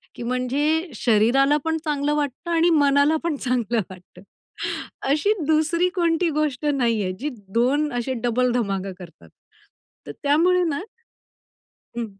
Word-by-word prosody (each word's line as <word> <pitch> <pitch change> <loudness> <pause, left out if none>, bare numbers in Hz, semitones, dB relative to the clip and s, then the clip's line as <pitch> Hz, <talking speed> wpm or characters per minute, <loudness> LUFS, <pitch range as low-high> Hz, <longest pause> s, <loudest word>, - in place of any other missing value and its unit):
की - - -7
म्हणजे 285 +7 0
शरीराला 250 +7 +3
पण 320 0 0
चांगलं 295 0 0
वाटतं 295 +4 -3
आणि 335 +1 +3
मनाला 285 0 +4
पण 335 -3 -1
चांगलं 240 -3 0
वाटतं. 180 0 -14 0.9
अशी 310 +9 +2
दुसरी 320 +3 +2
कोणती 335 -1 +1
गोष्ट 300 -2 -1
नाहीये. 230 -9 +1
जी 295 +3 -2 0.2
2 275 +6 +2
असे 245 +2 -2
डबल 245 +1 +1
धमाका 195 -5 -2
करतात. 170 - -13 0.8
तर 145 - -6
त्यामुळे 350 +5 +3
ना 290 -4 -1 1.2
हं. 235 - -1
280 Hz, 130 wpm, -23 LUFS, 240-315 Hz, 1.2 s, मनाला